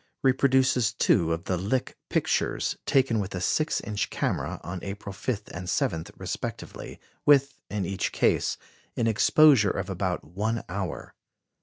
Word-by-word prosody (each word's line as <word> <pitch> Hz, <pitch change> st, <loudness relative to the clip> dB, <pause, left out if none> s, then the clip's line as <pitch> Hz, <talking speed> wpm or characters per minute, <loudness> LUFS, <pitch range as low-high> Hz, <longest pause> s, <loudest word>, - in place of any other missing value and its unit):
reproduces 130 Hz, -3 st, +3 dB
two 80 Hz, -1 st, +2 dB
of 80 Hz, +1 st, -2 dB
the 95 Hz, -1 st, -1 dB
Lick 105 Hz, +8 st, -1 dB
pictures, -, -, 0 dB
taken 130 Hz, -5 st, +3 dB
with 100 Hz, -1 st, -3 dB
a -, -, -2 dB
six 155 Hz, -, +1 dB
inch 105 Hz, -2 st, -2 dB
camera, -, -, -2 dB
on 90 Hz, +1 st, -5 dB
April 100 Hz, 0 st, -6 dB
5 105 Hz, +1 st, -3 dB
and 90 Hz, +1 st, -5 dB
7 80 Hz, -3 st, 0 dB
respectively, -, -, -6 dB, 0.2 s
with, 140 Hz, -1 st, +5 dB, 0.2 s
in 100 Hz, -2 st, -2 dB
each 95 Hz, +1 st, -2 dB
case, -, -, +1 dB, 0.4 s
an 115 Hz, -, +1 dB
exposure 115 Hz, +1 st, +5 dB
of -, -, -3 dB
about -, -, -2 dB
one 105 Hz, +8 st, -2 dB
hour. 95 Hz, -1 st, -5 dB
105 Hz, 145 wpm, -27 LUFS, 95-130 Hz, 0.4 s, with